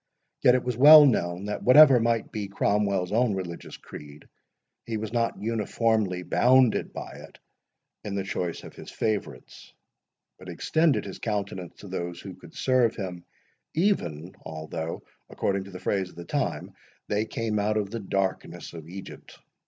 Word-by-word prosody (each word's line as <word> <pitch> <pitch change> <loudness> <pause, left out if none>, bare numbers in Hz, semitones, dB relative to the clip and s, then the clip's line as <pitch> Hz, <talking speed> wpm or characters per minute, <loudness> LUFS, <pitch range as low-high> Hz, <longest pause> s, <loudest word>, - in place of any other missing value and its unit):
Yet 125 - +6
it 125 - 0
was 125 -1 -2
well 150 +4 +10
known 90 -7 0
that 105 0 -4
whatever 135 0 +8
might 115 -1 0
be 105 -2 -4
Cromwell's 100 -2 0
own 115 -1 +2
religious 85 -3 -7
creed, 75 0 -12 0.6
he 115 -1 -4
was 110 +1 -5
not 115 -1 0
uniformly 110 -3 0
bounded 125 +3 +3
by - - -7 0.2
it - - -20 0.7
in 100 -1 -4
the 100 - -1
choice 90 -3 -4
of - - -11
his - - -11
favourites, 100 - -4 0.7
but 95 - -11
extended 140 - +1
his 95 - -8
countenance 100 -5 -4
to 100 - -10
those 85 -2 -5
who 95 0 -9
could 85 - -16
serve 125 -3 +2
him, 90 -4 -6 0.5
even, 90 - 0
although, 80 +1 -6 0.3
according 100 -1 -2
to - - -11
the 90 -1 -9
phrase 95 -1 -1
of - - -18
the 85 0 -9
time, - - -3 0.3
they 105 +1 0
came 110 -1 -2
out 105 +1 0
of 105 -2 -2
the 115 - -4
darkness 95 -3 -3
of 80 -1 -10
Egypt. 95 +2 -10
100 Hz, 160 wpm, -26 LUFS, 90-115 Hz, 0.7 s, well